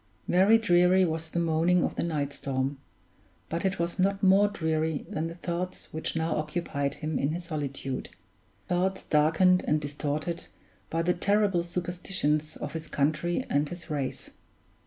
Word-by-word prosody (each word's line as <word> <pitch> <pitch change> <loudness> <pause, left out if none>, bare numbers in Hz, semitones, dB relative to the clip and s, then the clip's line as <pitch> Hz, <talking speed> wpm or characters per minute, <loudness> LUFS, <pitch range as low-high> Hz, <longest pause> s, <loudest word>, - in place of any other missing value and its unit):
Very 195 +5 +6
dreary 180 -2 +4
was 160 -1 -3
the 170 - -5
moaning 170 +1 +3
of - - -1
the - - -1
night 145 -4 -1
storm; 135 0 -2 0.7
but 165 +1 -2
it 195 0 0
was 170 +2 -2
not 195 +1 +1
more 195 +2 +6
dreary 160 -5 -1
than 155 +2 -2
the 165 - -7
thoughts 180 +1 -4
which 160 +1 -3
now 160 0 0
occupied 150 -2 -2
him 155 -2 -2
in 140 - +1
his 175 +1 -4
solitude 140 -5 -4 0.6
thoughts 185 +2 0
darkened 160 +5 +4
and 150 - +3
distorted 150 +3 -3 0.4
by 165 +1 0
the 180 +1 +2
terrible 200 0 +2
superstitions 170 -3 -2
of 145 - -5
his 160 -1 -5
country 155 - 0
and 145 +1 +1
his 175 -2 -8
race. 140 -3 -3
165 Hz, 155 wpm, -28 LUFS, 150-180 Hz, 0.7 s, Very